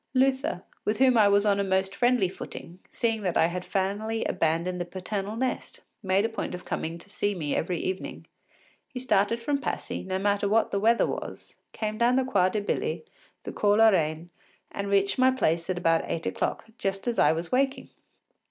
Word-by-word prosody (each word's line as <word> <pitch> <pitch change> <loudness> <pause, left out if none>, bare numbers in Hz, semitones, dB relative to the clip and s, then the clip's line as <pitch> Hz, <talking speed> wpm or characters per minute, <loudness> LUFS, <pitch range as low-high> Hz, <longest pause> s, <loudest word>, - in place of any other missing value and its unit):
Luther, 260 -8 +1 0.2
with 210 +1 0
whom 260 -1 +5
I 215 -3 +6
was 200 +1 +3
on 200 -1 +3
a - - +2
most 190 0 0
friendly 245 -3 +3
footing, 180 -1 -9
seeing 225 -2 -1
that 185 -4 0
I - - +5
had 180 +2 -3
finally 205 +4 -2
abandoned 170 +3 0
the - - -2
paternal 195 +3 -4
nest, 255 +2 -3 0.2
made 195 +1 +2
a - - 0
point 225 -4 -4
of 180 - -10
coming 165 +1 -3
to 170 - -14
see 205 0 -1
me 150 -5 -2
every 175 0 -1
morning. 190 - -9 0.6
He 260 - -7
started 230 -1 +1
from 285 +2 0
Passy, - - -3
no 185 0 -2
matter 200 +1 +1
what 225 +2 +2
the 200 - 0
weather 230 +3 +4
was, - - -6 0.2
came 215 0 -4
down 240 +1 +4
the 265 - +3
Quai 190 -8 +3
de 210 +2 -2
Billy, 450 - -2 0.4
the - - -5
Cours 205 0 +2
la 225 0 +7
Reine, 160 -2 0 0.4
and 200 0 -4
reached 200 +3 +2
my 260 0 +6
place 170 -10 0
at 185 - -1
about 165 -2 +2
eight 165 - -3
o’clock, - - -2
just 195 +3 -2
as 235 - 0
I - - +5
was 165 +1 -3
waking. 270 +1 0
200 Hz, 200 wpm, -27 LUFS, 180-225 Hz, 0.6 s, la